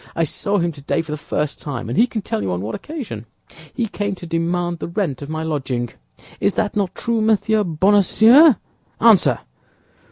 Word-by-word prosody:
I 165 Hz, -, +1 dB
saw 200 Hz, +6 st, -1 dB
him 170 Hz, -2 st, 0 dB
today 150 Hz, +2 st, -2 dB
for 160 Hz, -, -9 dB
the -, -, -1 dB
first 150 Hz, 0 st, -3 dB
time, 135 Hz, -7 st, -5 dB
and 120 Hz, -, -3 dB
he 240 Hz, -, +4 dB
can 220 Hz, -4 st, -4 dB
tell 110 Hz, -, -2 dB
you 95 Hz, -2 st, -2 dB
on 90 Hz, 0 st, -2 dB
what 105 Hz, +3 st, -4 dB
occasion; 225 Hz, -, -7 dB, 0.5 s
he 235 Hz, -, 0 dB
came 205 Hz, -2 st, -3 dB
to 180 Hz, -, -10 dB
demand 170 Hz, +1 st, -1 dB
the -, -, -4 dB
rent 170 Hz, -, -2 dB
of 145 Hz, -, -7 dB
my 160 Hz, 0 st, -3 dB
lodging. 135 Hz, -6 st, -2 dB, 0.5 s
Is 200 Hz, -, +1 dB
that 210 Hz, -2 st, -1 dB
not 195 Hz, -3 st, -1 dB
true, 230 Hz, -1 st, -1 dB
Monsieur 215 Hz, 0 st, +2 dB
Bonacieux? 205 Hz, -, +5 dB, 0.4 s
Answer!" 220 Hz, -5 st, +4 dB
175 Hz, 190 wpm, -20 LUFS, 150-210 Hz, 0.5 s, Bonacieux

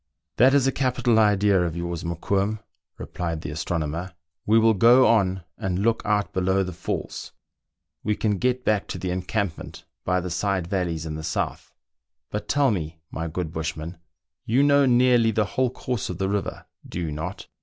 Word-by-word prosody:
" 80 Hz, -, -58 dB
That 130 Hz, +4 st, +6 dB
is 140 Hz, -2 st, +4 dB
a 135 Hz, -, +3 dB
capital 125 Hz, -4 st, +1 dB
idea 105 Hz, -2 st, +4 dB
of 85 Hz, -1 st, -2 dB
yours, 85 Hz, -1 st, -4 dB
Mokoum," 95 Hz, +5 st, -1 dB, 0.4 s
replied 85 Hz, -3 st, -4 dB
the -, -, -5 dB
astronomer: 85 Hz, +2 st, -3 dB
" 80 Hz, 0 st, -61 dB
we 110 Hz, +2 st, +5 dB
will 115 Hz, 0 st, +5 dB
go 120 Hz, +6 st, +6 dB
on 95 Hz, -5 st, +2 dB, 0.2 s
and 90 Hz, -2 st, -1 dB
look 110 Hz, +3 st, +1 dB
out 105 Hz, -1 st, 0 dB
below 95 Hz, +1 st, +1 dB
the 90 Hz, -1 st, -5 dB
falls. 90 Hz, +2 st, -5 dB, 0.7 s
We 105 Hz, 0 st, 0 dB
can 105 Hz, -3 st, 0 dB
get 125 Hz, 0 st, 0 dB
back 105 Hz, -2 st, +1 dB
to -, -, -5 dB
the 90 Hz, -, -3 dB
encampment 95 Hz, 0 st, -3 dB, 0.2 s
by 90 Hz, 0 st, +1 dB
the 90 Hz, 0 st, -5 dB
side 95 Hz, 0 st, 0 dB
valleys 85 Hz, -4 st, -2 dB
in 80 Hz, -, -4 dB
the 80 Hz, 0 st, -6 dB
south. 80 Hz, -, -3 dB, 0.6 s
But 105 Hz, -, -4 dB
tell 140 Hz, -2 st, +3 dB
me, 80 Hz, -5 st, -3 dB
my 80 Hz, +1 st, -3 dB
good 80 Hz, 0 st, -4 dB
bushman, 80 Hz, +1 st, -4 dB, 0.4 s
you 125 Hz, +5 st, +2 dB
know 140 Hz, -1 st, +5 dB
nearly 120 Hz, -2 st, +4 dB
the 110 Hz, -1 st, +1 dB
whole 130 Hz, +5 st, 0 dB
course 125 Hz, -2 st, -4 dB
of 90 Hz, -, -4 dB
the 95 Hz, 0 st, -1 dB
river, 100 Hz, 0 st, -3 dB, 0.2 s
do -, -, -5 dB
you 80 Hz, -3 st, -2 dB
not 75 Hz, +1 st, -5 dB
95 Hz, 185 wpm, -24 LUFS, 85-115 Hz, 0.7 s, That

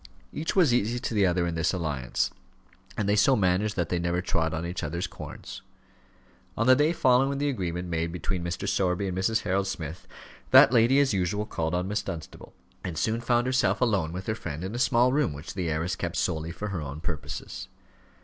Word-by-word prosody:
Each 160 Hz, -, -3 dB
was 170 Hz, -10 st, +5 dB
easy 120 Hz, 0 st, +1 dB
to 120 Hz, -, -3 dB
the 100 Hz, -3 st, +3 dB
other 90 Hz, 0 st, +1 dB
in 85 Hz, -, -2 dB
this 80 Hz, +3 st, 0 dB
alliance, 75 Hz, -8 st, -1 dB, 0.7 s
and 105 Hz, -, 0 dB
they 100 Hz, -, +3 dB
so 130 Hz, +6 st, +5 dB
managed 100 Hz, +1 st, +1 dB
that 85 Hz, -3 st, -1 dB
they 90 Hz, -, 0 dB
never 85 Hz, +1 st, 0 dB
trod 85 Hz, -3 st, 0 dB
on 80 Hz, +1 st, -3 dB
each 90 Hz, +1 st, -4 dB
other's 85 Hz, +4 st, -2 dB
corns. -, -, -9 dB, 1.0 s
On 115 Hz, -, +1 dB
the 130 Hz, +1 st, +7 dB
day 150 Hz, +4 st, +3 dB
following 135 Hz, -3 st, +3 dB
the 145 Hz, +1 st, 0 dB
agreement 90 Hz, -7 st, -3 dB
made 85 Hz, -1 st, -1 dB
between 90 Hz, +1 st, -3 dB
Mr. 85 Hz, 0 st, -3 dB
Sowerby 95 Hz, +1 st, +1 dB
and 90 Hz, -, -3 dB
Mrs. 110 Hz, +4 st, +1 dB
Harold 95 Hz, 0 st, 0 dB
Smith, 80 Hz, -2 st, -6 dB, 0.4 s
that -, -, +8 dB
lady 120 Hz, +3 st, +5 dB
as 140 Hz, -5 st, +3 dB
usual 100 Hz, +2 st, 0 dB
called 80 Hz, -5 st, -2 dB
on 90 Hz, +1 st, -1 dB
Miss 105 Hz, +1 st, -1 dB
Dunstable, 80 Hz, -2 st, -8 dB, 0.3 s
and 85 Hz, -3 st, -4 dB
soon 115 Hz, +1 st, 0 dB
found 120 Hz, 0 st, +2 dB
herself 125 Hz, -7 st, +2 dB
alone 100 Hz, -10 st, +1 dB
with 90 Hz, +2 st, -6 dB
her 110 Hz, -, 0 dB
friend 85 Hz, -7 st, -6 dB
in 95 Hz, +3 st, -4 dB
a 120 Hz, -, -3 dB
small 125 Hz, 0 st, +3 dB
room 140 Hz, -, +1 dB
which 70 Hz, +2 st, -8 dB
the 90 Hz, -3 st, -2 dB
heiress 80 Hz, +3 st, -1 dB
kept -, -, -4 dB
solely 80 Hz, +1 st, -1 dB
for 105 Hz, +5 st, -5 dB
her 90 Hz, -5 st, -3 dB
own 70 Hz, +1 st, -6 dB
purposes. 80 Hz, -3 st, -5 dB
95 Hz, 210 wpm, -27 LUFS, 85-115 Hz, 1.0 s, that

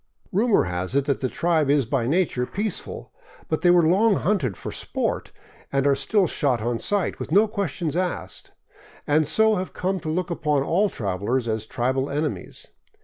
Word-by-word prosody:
Rumor 215 Hz, +3 st, +3 dB
has 90 Hz, +5 st, -3 dB
it 140 Hz, -1 st, +2 dB
that 140 Hz, -1 st, 0 dB
the 130 Hz, -, -1 dB
tribe 160 Hz, -2 st, +1 dB
is 140 Hz, -2 st, +3 dB
by 120 Hz, 0 st, -1 dB
nature 145 Hz, -5 st, +1 dB
peaceful; 205 Hz, -1 st, -4 dB, 0.4 s
but 155 Hz, -, -1 dB
they 175 Hz, -, +4 dB
were 175 Hz, -2 st, +5 dB
long 200 Hz, +5 st, +4 dB
hunted 185 Hz, -, 0 dB
for -, -, -6 dB
sport -, -, -3 dB, 0.4 s
and 135 Hz, 0 st, +1 dB
are 140 Hz, -, +5 dB
still 200 Hz, +7 st, +2 dB
shot 140 Hz, -6 st, 0 dB
on 115 Hz, +1 st, -2 dB
sight, 205 Hz, -4 st, -1 dB
with -, -, -6 dB
no 205 Hz, +6 st, +5 dB
questions 180 Hz, -7 st, -3 dB
asked, 175 Hz, -, -3 dB, 0.5 s
and 150 Hz, 0 st, +2 dB
so 220 Hz, +7 st, +3 dB
have 185 Hz, +1 st, -4 dB
come 190 Hz, +1 st, -1 dB
to 155 Hz, -, -5 dB
look 175 Hz, +2 st, -2 dB
upon 150 Hz, -4 st, 0 dB
all 195 Hz, +8 st, +2 dB
travelers 105 Hz, -, -2 dB
as 110 Hz, -1 st, -2 dB
tribal 130 Hz, +4 st, -1 dB
enemies. 150 Hz, +1 st, -4 dB
155 Hz, 180 wpm, -24 LUFS, 130-185 Hz, 0.5 s, were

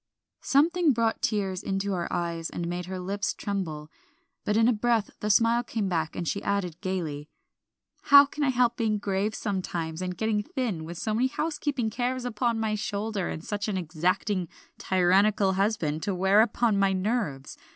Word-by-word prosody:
Something 320 Hz, +2 st, +3 dB
brought 230 Hz, -1 st, 0 dB
tears 195 Hz, -4 st, -1 dB
into 195 Hz, +1 st, -2 dB
her 175 Hz, -3 st, -2 dB
eyes 170 Hz, -1 st, -2 dB
and 170 Hz, -, -4 dB
made 175 Hz, 0 st, -4 dB
her 190 Hz, 0 st, -4 dB
lips 195 Hz, +2 st, -2 dB
tremble, 160 Hz, -7 st, -4 dB, 0.5 s
but 210 Hz, -, +1 dB
in 225 Hz, 0 st, +5 dB
a 245 Hz, -, +4 dB
breath 230 Hz, -1 st, +1 dB
the 210 Hz, -, -2 dB
smile 230 Hz, +3 st, +4 dB
came 225 Hz, -4 st, -3 dB
back, 165 Hz, -3 st, -1 dB
and 170 Hz, -, -4 dB
she 200 Hz, -, -1 dB
added 185 Hz, -4 st, -2 dB
gayly 160 Hz, -7 st, -3 dB, 0.8 s
"How 280 Hz, 0 st, +9 dB
can 290 Hz, +1 st, -4 dB
I 280 Hz, -, +3 dB
help 245 Hz, -2 st, +2 dB
being 220 Hz, -2 st, +1 dB
grave 200 Hz, +1 st, -1 dB
sometimes, 175 Hz, -5 st, -3 dB
and 180 Hz, -1 st, -4 dB
getting 220 Hz, -1 st, 0 dB
thin, 210 Hz, -8 st, -3 dB
with 170 Hz, +1 st, -7 dB
so 215 Hz, +5 st, -2 dB
many 245 Hz, +4 st, +2 dB
housekeeping 290 Hz, -5 st, -2 dB
cares 250 Hz, +2 st, -2 dB
upon 235 Hz, -1 st, 0 dB
my 220 Hz, -1 st, 0 dB
shoulders, 205 Hz, -2 st, -2 dB
and 160 Hz, -, -6 dB
such 205 Hz, 0 st, -3 dB
an 205 Hz, -3 st, -1 dB
exacting, 180 Hz, +3 st, -1 dB, 0.3 s
tyrannical 190 Hz, +2 st, +3 dB
husband 190 Hz, -6 st, 0 dB
to 195 Hz, +1 st, -2 dB
wear 190 Hz, +3 st, +4 dB
upon 225 Hz, -2 st, +2 dB
my 195 Hz, -1 st, +3 dB
nerves. 185 Hz, -, -2 dB
200 Hz, 175 wpm, -27 LUFS, 180-225 Hz, 0.8 s, How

